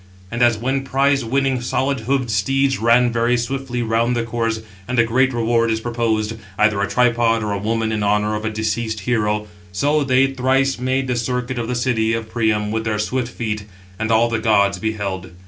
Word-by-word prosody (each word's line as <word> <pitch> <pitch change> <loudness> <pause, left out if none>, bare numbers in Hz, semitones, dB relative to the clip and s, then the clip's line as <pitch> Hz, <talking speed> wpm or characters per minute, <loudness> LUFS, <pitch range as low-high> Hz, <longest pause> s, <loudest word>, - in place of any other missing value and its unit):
And 120 +1 -3
as 120 -2 +4
when 130 +4 -1
prize 135 0 +1
winning 135 +1 0
705 - - -6
solid 135 0 0 0.2
hoofed 125 -3 -4
steeds 135 +6 +1
ran 120 +2 +4
very 120 +1 +1
swiftly 125 0 -3
round 115 +2 +1
the 120 - 0
course, 115 -1 -2 0.3
and 125 - -2
a 115 - +6
great 130 +3 +2
reward 115 -1 +1
is 110 0 0
proposed, 115 -2 -1 0.2
either 105 -1 +2
a 100 - +1
tripod, 115 0 +2
or 105 - -2
a 100 - -2
woman 110 +2 -1
[in 110 -1 -1
honour] 105 +1 +1
of 105 - -4
a 110 - -1
deceased 110 0 -2
hero; 105 -1 0 0.3
so 145 +10 +1
they 135 -1 +3
thrice 135 0 +1
made 130 +1 0
the 125 -1 -1
circuit 125 +1 -2
of 115 - -3
the 125 - -2
city 115 -2 +1
of 115 -1 -4
Priam 110 -3 0
with 110 0 -1
their 110 -1 0
swift 120 +4 -1
feet: 110 -4 -4 0.3
and 110 +1 -1
all 115 +1 +4
the 115 -1 -1
gods 100 -4 +2
beheld. 100 -4 -4
115 Hz, 205 wpm, -20 LUFS, 110-125 Hz, 0.3 s, a